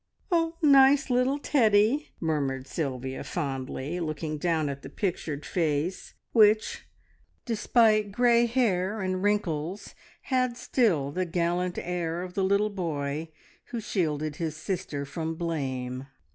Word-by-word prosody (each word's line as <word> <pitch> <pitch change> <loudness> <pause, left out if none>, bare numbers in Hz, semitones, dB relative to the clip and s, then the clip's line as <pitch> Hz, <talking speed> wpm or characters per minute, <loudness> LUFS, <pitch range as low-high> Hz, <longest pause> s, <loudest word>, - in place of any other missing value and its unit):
"Nice 275 -1 +6
little 250 +3 +2
Teddy!" 235 0 +3
murmured 140 -5 -1
Sylvia 130 -3 -4
fondly, 135 +3 -3
looking 155 -2 -3
down 160 -2 +1
at 140 0 -4
the 135 - -9
pictured 155 -4 -3
face, 165 +1 -1 0.2
which, 215 -1 +3 0.6
despite 220 -2 +3
grey 235 +2 +4
hair 215 -4 +1
and 185 -1 -1
wrinkles, 195 -2 -1 0.3
had 255 -2 0
still 175 - +1
the 185 +4 -1
gallant 175 +1 -1
air 175 -1 -2
of 180 -1 -8
the 195 - 0
little 200 +2 +2
boy 155 -4 -3 0.4
who 240 - -5
shielded 155 -7 -1
his 160 -2 -3
sister 155 -5 -3
from 160 +2 -4
blame. 135 -6 -3
175 Hz, 120 wpm, -27 LUFS, 150-215 Hz, 0.6 s, Nice